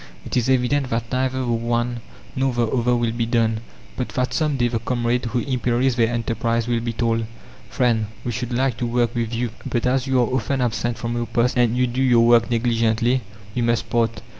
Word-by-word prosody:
It -, -, -4 dB
is 125 Hz, 0 st, +1 dB
evident 130 Hz, +1 st, +2 dB
that 115 Hz, 0 st, -2 dB
neither 130 Hz, 0 st, 0 dB
the -, -, -2 dB
one 120 Hz, 0 st, -1 dB, 0.4 s
nor 130 Hz, 0 st, +1 dB
the 120 Hz, -1 st, +1 dB
other 125 Hz, +1 st, +1 dB
will 120 Hz, -1 st, 0 dB
be 115 Hz, 0 st, -2 dB
done, 115 Hz, -2 st, +1 dB, 0.4 s
but 125 Hz, -, -3 dB
that 125 Hz, 0 st, 0 dB
some 150 Hz, -3 st, 0 dB
day 120 Hz, -1 st, +2 dB
the 115 Hz, -1 st, -1 dB
comrade 120 Hz, +1 st, -1 dB
who 120 Hz, +1 st, -1 dB
imperils 125 Hz, 0 st, 0 dB
their 115 Hz, -1 st, +2 dB
enterprise 115 Hz, 0 st, -1 dB
will 120 Hz, -1 st, +1 dB
be 115 Hz, 0 st, -3 dB
told: 115 Hz, 0 st, 0 dB, 0.4 s
"Friend, 115 Hz, -5 st, +1 dB, 0.2 s
we 120 Hz, -, -2 dB
should 120 Hz, +1 st, -4 dB
like 125 Hz, 0 st, 0 dB
to 120 Hz, -, -2 dB
work 120 Hz, 0 st, +1 dB
with 115 Hz, -2 st, -2 dB
you; 120 Hz, 0 st, -2 dB
but 120 Hz, -1 st, -2 dB
as 130 Hz, +1 st, +1 dB
you 130 Hz, -1 st, +2 dB
are 120 Hz, -, +4 dB
often 130 Hz, +2 st, -1 dB
absent 120 Hz, -1 st, -1 dB
from 115 Hz, +1 st, -3 dB
your 120 Hz, 0 st, -2 dB
post, 120 Hz, +1 st, +1 dB
and 120 Hz, -1 st, +2 dB
you 125 Hz, -, +3 dB
do 125 Hz, +2 st, -2 dB
your 120 Hz, -3 st, +5 dB
work 120 Hz, 0 st, +5 dB
negligently, 115 Hz, +1 st, +1 dB, 0.3 s
we 120 Hz, -, -1 dB
must 115 Hz, -1 st, 0 dB
part. 115 Hz, -1 st, +1 dB
120 Hz, 215 wpm, -22 LUFS, 115-125 Hz, 0.4 s, your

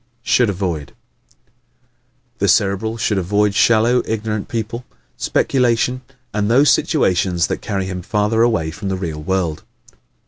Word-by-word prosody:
Should 125 Hz, -3 st, +3 dB
Avoid 90 Hz, -7 st, -3 dB, 1.4 s
¶ -, -, -40 dB
The 100 Hz, -, +1 dB
Cerebral 100 Hz, +3 st, +1 dB
should 105 Hz, -3 st, 0 dB
avoid 100 Hz, +3 st, +1 dB
shallow, 115 Hz, +3 st, +3 dB
ignorant 110 Hz, -1 st, -3 dB
people, 115 Hz, +1 st, -4 dB, 0.3 s
speculation 125 Hz, 0 st, +1 dB, 0.3 s
and 105 Hz, 0 st, 0 dB
those 130 Hz, +3 st, +5 dB
situations 90 Hz, -5 st, +1 dB
that -, -, -3 dB
carry 100 Hz, -3 st, -2 dB
him 95 Hz, -1 st, -5 dB
farther 105 Hz, +3 st, 0 dB
away 85 Hz, -10 st, +1 dB
from 95 Hz, +5 st, -5 dB
the 95 Hz, -, -1 dB
real 80 Hz, -5 st, -4 dB
world. 85 Hz, -2 st, -1 dB
105 Hz, 135 wpm, -19 LUFS, 95-115 Hz, 1.4 s, those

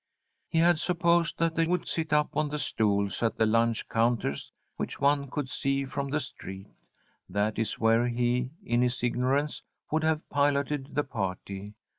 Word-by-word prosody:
He -, -, -1 dB
had 170 Hz, 0 st, +5 dB
supposed 170 Hz, -1 st, +2 dB
that 165 Hz, -1 st, +1 dB
they 165 Hz, 0 st, +1 dB
would 180 Hz, 0 st, 0 dB
sit 160 Hz, -2 st, -2 dB
up 150 Hz, 0 st, +2 dB
on 155 Hz, -1 st, +1 dB
the 150 Hz, -, -3 dB
stools 100 Hz, -7 st, 0 dB
at 115 Hz, -1 st, 0 dB
the 110 Hz, -, +3 dB
lunch 115 Hz, +1 st, +2 dB
counters 115 Hz, -, 0 dB, 0.2 s
which -, -, -4 dB
one 140 Hz, 0 st, +2 dB
could 145 Hz, +1 st, -3 dB
see 135 Hz, +1 st, -1 dB
from 140 Hz, +1 st, -3 dB
the 150 Hz, +2 st, 0 dB
street. 95 Hz, -7 st, -8 dB, 0.6 s
That 105 Hz, +3 st, 0 dB
is 115 Hz, -, -1 dB
where 115 Hz, +2 st, +3 dB
he, 120 Hz, +1 st, 0 dB
in 120 Hz, +1 st, +1 dB
his 125 Hz, -1 st, 0 dB
ignorance, 130 Hz, +5 st, 0 dB, 0.3 s
would 155 Hz, +1 st, +1 dB
have 160 Hz, 0 st, 0 dB
piloted 140 Hz, -1 st, 0 dB
the 145 Hz, -, +2 dB
party. 100 Hz, -3 st, -5 dB
135 Hz, 170 wpm, -28 LUFS, 115-150 Hz, 0.6 s, had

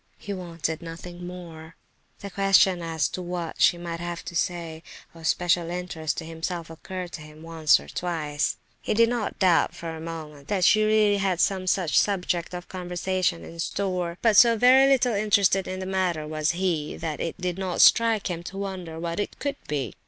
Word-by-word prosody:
He 205 Hz, -, -6 dB
wanted 170 Hz, -3 st, -4 dB
nothing 175 Hz, +1 st, -8 dB
more. 165 Hz, -3 st, -10 dB, 0.5 s
The 200 Hz, -, -7 dB
question 195 Hz, -2 st, +4 dB
as 165 Hz, -2 st, 0 dB
to 185 Hz, -, -5 dB
what 175 Hz, -2 st, -5 dB
she 175 Hz, -, +5 dB
might 170 Hz, -1 st, -5 dB
have 175 Hz, 0 st, -5 dB
to 175 Hz, -, -7 dB
say 165 Hz, -2 st, -2 dB, 0.3 s
of 165 Hz, -1 st, -6 dB
special 175 Hz, -1 st, +1 dB
interest 175 Hz, -3 st, -3 dB
to 165 Hz, -, -4 dB
himself 165 Hz, +1 st, -5 dB
occurred 180 Hz, +2 st, -7 dB
to 150 Hz, -, -7 dB
him 155 Hz, +1 st, -13 dB
once 160 Hz, -4 st, +3 dB
or -, -, -12 dB
twice. 155 Hz, -4 st, -2 dB, 0.2 s
He -, -, -1 dB
did 230 Hz, +1 st, +5 dB
not 240 Hz, -3 st, -2 dB
doubt, 180 Hz, -4 st, +3 dB
for 165 Hz, -1 st, -6 dB
a 160 Hz, -, -8 dB
moment, 155 Hz, -3 st, -8 dB
that 185 Hz, -1 st, +1 dB
she 215 Hz, +3 st, +5 dB
really 215 Hz, -1 st, +3 dB
had 190 Hz, -3 st, 0 dB
some 185 Hz, -1 st, +1 dB
such 180 Hz, -3 st, +3 dB
subject 180 Hz, -3 st, -1 dB
of 175 Hz, 0 st, -7 dB
conversation 180 Hz, -1 st, -2 dB
in 165 Hz, -, -11 dB
store, 180 Hz, -1 st, -2 dB
but 225 Hz, -3 st, +4 dB
so 230 Hz, +2 st, +7 dB
very 260 Hz, +4 st, +6 dB
little 255 Hz, -3 st, +3 dB
interested 200 Hz, -2 st, +2 dB
in 185 Hz, 0 st, -4 dB
the 190 Hz, -, -4 dB
matter 185 Hz, -5 st, -1 dB
was 155 Hz, +1 st, 0 dB
he 170 Hz, -4 st, -1 dB
that 155 Hz, -3 st, -4 dB
it 165 Hz, -, -3 dB
did 180 Hz, 0 st, -3 dB
not 185 Hz, -2 st, -3 dB
strike 230 Hz, -2 st, +5 dB
him 170 Hz, -2 st, -3 dB
to 195 Hz, -, -7 dB
wonder 185 Hz, -5 st, -5 dB
what 170 Hz, +1 st, -3 dB
it 205 Hz, -, -3 dB
could 285 Hz, -1 st, -3 dB
be. 135 Hz, -8 st, -2 dB
175 Hz, 195 wpm, -25 LUFS, 165-190 Hz, 0.5 s, so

